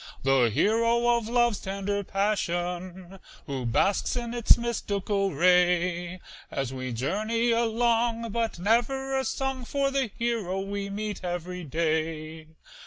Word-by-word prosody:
The 135 -3 +4
hero 230 - +3
of 225 -1 -4
love's 240 -3 +2
tender 200 +1 -2
passion, 185 -2 -2 0.3
Who 135 -4 -3
basks 195 - +1
in 240 -1 -3
its 240 -2 +5
mystical 200 -4 -1
ray, 180 0 +2 0.3
As 135 -2 -3
we 130 -1 -4
journey 215 - 0
along, 230 0 +1
but 230 -2 -1
never 245 +8 +1
a 265 - +1
song 265 -1 -2
For 275 +3 0
the 270 -2 +1
hero 225 -6 -1
we 200 0 -4
meet 205 -1 -4
every 180 0 -4
day. 160 0 -2
200 Hz, 125 wpm, -27 LUFS, 175-235 Hz, 0.3 s, its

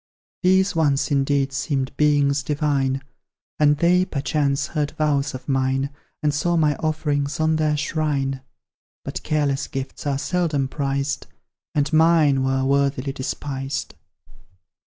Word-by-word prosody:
These, 190 0 +3
once, 145 -3 +1
indeed, 140 0 +1
seemed 135 -1 -2
Beings 145 -1 +3
Divine; 140 -2 0 0.6
And 150 -1 +4
they, 175 +3 +4
perchance, 140 -3 0
heard 150 -2 -2
vows 145 -3 +1
of 130 - -9
mine, 135 0 0 0.3
And 150 -1 +2
saw 170 +4 +1
my 150 -2 +3
offerings 150 -2 -1
on 155 0 +2
their 155 -1 +1
shrine; 140 -3 -1 0.6
But - - -4
careless 145 -3 0
gifts 135 +2 -5
are 140 -1 +1
seldom 155 -4 0
prized, 140 - -2 0.5
And 150 +1 0
MINE 155 -4 +4
were 135 0 +1
worthily 140 0 +1
despised. 135 +1 -4
145 Hz, 125 wpm, -22 LUFS, 135-155 Hz, 0.6 s, And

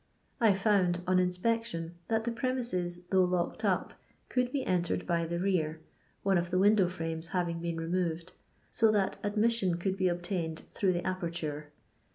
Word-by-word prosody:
I 225 -3 +5
found, 190 -3 +2
on 185 0 +3
inspec 185 +6 +1
tion, 165 -6 -4
that 225 -1 +1
the 235 - -1
premises, 230 -9 -2
though 190 -1 +5
locked 180 -1 -1
up, - - +1 0.4
could 250 -1 +1
be 275 -1 -1
entered 175 -2 0
by 170 -2 0
the 170 +1 -2
rear, 170 -4 0 0.4
one 195 -2 +3
of 175 0 -3
the 185 - 0
window 200 0 +5
frames 165 -2 -4
having 170 -1 -1
been 170 0 -3
removed, 170 +1 -2 0.4
so 225 -1 +4
that 200 -2 +1
admission 210 -3 +1
could 190 +2 -1
be 190 - +1
obtiiined 175 -2 -1
through 190 -3 +2
the 175 - -2
aperture. 165 -5 -3
180 Hz, 170 wpm, -31 LUFS, 170-205 Hz, 0.4 s, I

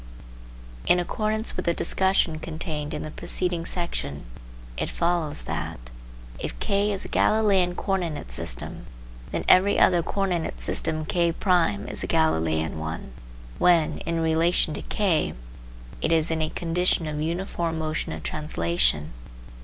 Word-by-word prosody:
In 180 - +5
accordance 215 +5 -1
with - - -3
the 170 - +3
discussion 190 -3 +2
contained 155 -2 -4
in 150 - -4
the 155 - -6
preceding 175 +1 -2
section, 70 - -2 0.5
it - - -2
follows 170 -3 0
that: - - -4 0.6
If - - -5
K 200 +1 +1
is 195 - -3
a - - -5
Galileian 195 -5 +3
co 195 - -3
ordinate 175 -6 -2
system. - - -4 0.4
then - - -2
every 195 +2 +6
other 175 -2 +5
co 195 +4 -3
ordinate 180 -4 -1
system 155 -1 -1
K' 170 +1 +2
is 180 +2 +1
a - - -2
Galileian 80 - +1
one, 80 -4 -5 0.5
when, 170 -3 +4
in 165 0 -2
relation 160 0 +2
to - - -4
K, 190 -7 +1 0.7
it - - +1
is 165 0 +3
in 160 0 0
a 155 - 0
condition 175 0 +1
of 150 -1 -3
uniform 170 0 -2
motion 155 0 -2
of 80 -1 -6
translation. 80 - 0
165 Hz, 145 wpm, -25 LUFS, 155-180 Hz, 0.7 s, every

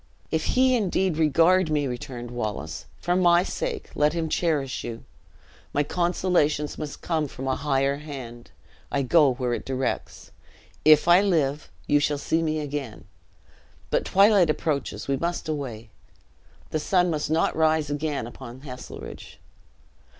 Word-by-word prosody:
"If 160 -1 0
he 255 0 +5
indeed 190 -6 0
regard 165 +3 +4
me," 150 -2 +1
returned 125 -2 -6
Wallace, 110 -4 -4
"for 175 - 0
my 175 -1 +5
sake 485 - -4
let 150 +1 +2
him 165 -2 -2
cherish 150 -7 -1
you. 115 -1 -6 0.7
My 145 - +2
consolations 170 -3 0
must 150 -2 -6
come 160 -3 0
from 135 0 -7
a 130 - +1
higher 140 -1 0
hand; 130 -6 -9 0.4
I 140 - +1
go 145 0 +4
where 125 -1 -1
it - - -3
directs. 130 -1 -3 0.5
If 155 +1 +6
I 175 +2 +7
live, 150 -7 0 0.2
you 145 - +3
shall 145 0 0
see 160 +3 0
me 155 -1 -1
again; 145 -6 -5 0.9
but - - +2
twilight 195 -3 +5
approaches 150 -2 -2
we 135 0 +1
must 170 +3 -3
away. 125 -8 -5 0.8
The 155 - 0
sun 180 +2 +2
must 150 -2 -2
not 160 +1 +1
rise 155 -2 +2
again 145 -4 -2
upon 120 +1 -10
Heselrigge." 125 -3 -9
150 Hz, 145 wpm, -25 LUFS, 135-170 Hz, 0.9 s, I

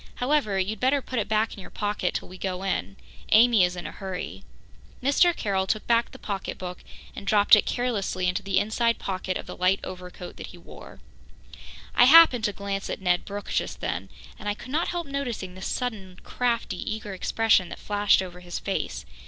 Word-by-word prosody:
"However, 250 -6 +1
you'd 195 +3 -1
better 265 +3 +3
put 255 -2 -3
it 210 - -1
back 220 +1 +1
in - - -10
your 190 - -10
pocket 205 -3 -2
till - - -3
we 185 0 -12
go 185 -1 -3
in. 100 - -2 0.4
Amy 225 -2 +6
is 180 0 +1
in 175 - -7
a - - -5
hurry." 180 - -6 0.6
Mr. 285 +6 +4
Carroll 190 -3 -1
took 215 +2 -1
back 235 0 +2
the - - -12
pocketbook 185 -3 -5 0.3
and 200 - -8
dropped 205 +1 +7
it 210 - +1
carelessly 205 -7 -1
into 180 +3 0
the 195 -1 -1
inside 225 +3 +1
pocket 185 -1 -3
of - - -7
the - - -8
light 185 +2 +2
overcoat 180 -1 -8
that - - -7
he - - -12
wore. - - -13 0.9
I 245 - +6
happened 270 -5 +8
to 205 - +1
glance 200 -1 -4
at - - -3
Ned 180 -2 +1
Brooke 205 0 -6
just - - -2
then, - - -3 0.3
and 210 - -3
I 205 - -1
could 255 - -10
not 320 +4 +1
help 350 -1 -3
noticing 250 -10 -4
the 185 - -11
sudden 200 -6 -4
crafty, 240 -2 -1 0.2
eager 210 -2 -7
expression 190 -1 +2
that - - -7
flashed 205 -1 +2
over 180 -1 -9
his 175 -1 -6
face. 65 - -3
205 Hz, 200 wpm, -26 LUFS, 185-235 Hz, 0.9 s, happened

